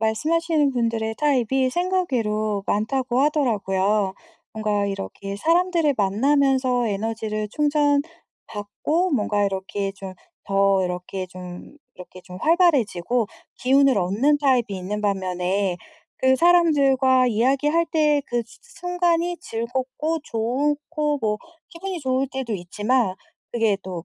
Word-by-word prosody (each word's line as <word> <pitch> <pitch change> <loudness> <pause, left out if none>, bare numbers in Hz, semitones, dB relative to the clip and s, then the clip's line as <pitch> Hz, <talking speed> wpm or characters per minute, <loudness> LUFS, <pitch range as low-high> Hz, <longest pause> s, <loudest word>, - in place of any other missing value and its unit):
말씀하시는 305 +6 +1
분들의 230 -2 -1
타입이 265 -2 +1
생각 360 0 -1
외로 215 -3 -1
많다고 250 +4 0
하더라고요. 205 -8 +1 0.4
뭔가 210 -2 -1
이렇게 195 - -5
사람들을 335 - +2
만나면서 255 +3 +2
에너지를 215 +1 -3
충전 290 +1 +2 0.4
받고 295 - -2
뭔가 210 -4 +1
이렇게 195 0 -3
좀 190 -1 -8 0.3
더 195 -1 +3
이렇게 180 +1 -4
좀 180 +6 -10 0.2
이렇게 180 0 -12
좀 180 0 -11
활발해지고 250 - +2 0.3
기운을 270 -1 +4
얻는 205 +11 +2
타입이 265 -4 +2
있는 195 +3 -4
반면에 190 -1 -1 0.4
그 260 0 +4
사람들과 275 -6 +4
이야기할 275 +8 +2
때 300 -2 +3
그 240 -1 -1
수 225 - -18
순간이 355 -6 -1
즐겁고 260 +7 -3
좋고 295 +5 -1
뭐 210 -1 0 0.3
기분이 365 +1 -5
좋을 260 0 0
때도 265 -4 -4
있지만 205 +4 0 0.4
그게 220 -4 +2
또 180 -2 -6
245 Hz, 275 characters per minute, -23 LUFS, 205-295 Hz, 0.4 s, 기운을